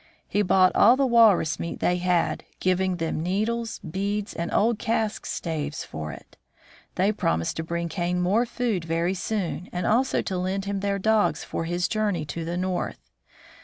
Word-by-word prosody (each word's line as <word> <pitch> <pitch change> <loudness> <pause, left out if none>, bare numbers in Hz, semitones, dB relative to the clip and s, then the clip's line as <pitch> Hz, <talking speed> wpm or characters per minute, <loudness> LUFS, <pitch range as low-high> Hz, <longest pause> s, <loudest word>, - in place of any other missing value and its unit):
He 205 - +1
bought 185 -1 +4
all 240 +5 +6
the 275 - +3
walrus 220 -10 +4
meat 170 - -4
they 180 - +2
had, 180 -1 +1 0.2
giving 185 0 +1
them 165 -2 -2
needles, 220 +6 -1
beads, 200 +5 -2
and 170 0 -3
old 225 +1 +2
cask 220 -2 -1
staves 155 -3 -3
for 75 -1 -6
it. - - -13 0.6
They 195 +3 +3
promised 80 - -1
to 160 - -2
bring 170 +1 -2
Kane 175 +1 -1
more 205 +7 +2
food 235 -7 -1
very 165 +2 0
soon, 185 -2 -3
and 180 0 -3
also 255 +4 +2
to 185 - -3
lend 190 +2 -2
him 200 0 -2
their 200 0 0
dogs 210 -6 +2
for 165 - -4
his 175 +1 0
journey 205 -7 -1
to 165 +3 -5
the 170 +2 -3
north. 185 0 -3
185 Hz, 175 wpm, -25 LUFS, 170-210 Hz, 0.6 s, all